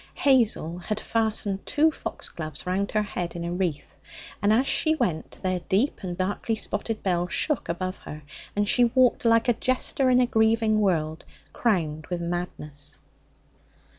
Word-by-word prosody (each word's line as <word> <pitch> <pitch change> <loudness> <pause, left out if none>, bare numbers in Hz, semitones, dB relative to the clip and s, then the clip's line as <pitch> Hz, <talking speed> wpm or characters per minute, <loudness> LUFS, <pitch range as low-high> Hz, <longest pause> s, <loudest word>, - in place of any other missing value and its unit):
Hazel 225 - +2
had 210 +4 -3
fastened 215 -4 -1
two 315 +2 +3
foxgloves 155 - -6
round 190 +2 0
her 215 -1 +1
head 175 -4 -4
in 170 0 -4
a 170 - -2
wreath, 175 -6 -3 0.4
and 205 +2 +3
as 250 +5 +3
she 315 0 +2
went 165 - -2
their 185 -1 0
deep 210 +9 +1
and 180 -3 -5
darkly 200 +4 -1
spotted 215 +1 -2
bells 180 -2 0
shook 300 -5 0
above 185 +2 -2
her, 150 0 -9 0.3
and 205 0 +1
she 245 +3 +5
walked, 250 0 +3
like 230 0 +4
a 240 - +5
jester 255 +2 +1
in 250 0 +5
a 250 - +5
grieving 220 -1 +3
world, 160 -5 0 0.3
crowned 155 -9 0
with 175 -1 -3
madness. 150 -5 -4
200 Hz, 160 wpm, -26 LUFS, 175-230 Hz, 0.4 s, she